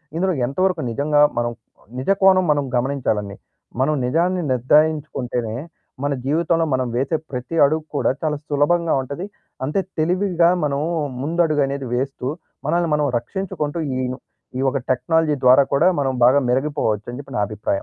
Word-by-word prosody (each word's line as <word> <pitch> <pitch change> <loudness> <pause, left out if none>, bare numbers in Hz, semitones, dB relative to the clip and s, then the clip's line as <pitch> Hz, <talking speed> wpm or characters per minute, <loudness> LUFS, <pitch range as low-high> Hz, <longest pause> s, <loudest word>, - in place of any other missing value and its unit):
ఇందులో 185 +2 +1
ఎంతవరకు 180 +5 0
నిజంగా 145 +4 +2 0.2
మనం 120 0 -1 0.5
నిజ 135 - 0
కోణం 190 -1 +6
మనం 145 -1 +1
గమనించాలండి. 120 -6 -1 0.5
మనం 150 +3 +2
నిజాన్ని 175 +7 +1
నిర్ధారించుకుంటేనే 130 -4 +1 0.5
మన 145 0 +1
జీవితంలో 165 +3 +1
మనం 130 -1 0
వేసే 135 +6 0
ప్రతి 125 +6 -5
అడుగు 155 +2 0
కూడా - - +2
చాలా 150 -2 -1
సులభంగా 160 +3 +2
ఉంటది. 140 +8 -6 0.4
అంతే 150 +9 0 0.2
తెలివిగా 175 +1 +2
మనం 140 -1 0 0.4
ముందడుగు 155 0 +1
అనేది 140 -1 -4
వేస్తూ 130 0 -2 0.4
మనల్ని 170 -1 +1
మనం 150 -1 +1
రక్షించుకుంటూ 170 -1 -4 0.2
ఈ - - -1 0.6
ఈ - - -3
ఒక 140 - -2
టెక్నాలజీ 155 +4 +2
ద్వారా 130 +2 +7
కూడా 160 +6 +4
మనం 135 -1 +1
బాగా 130 +4 +6
మెరిగిపోవచ్చు 130 -6 -1
అని 125 - -7
చెప్పి 135 -3 -10
నా 105 - +2
అభిప్రాయం. 105 -1 -6
145 Hz, 145 wpm, -21 LUFS, 130-165 Hz, 0.6 s, ద్వారా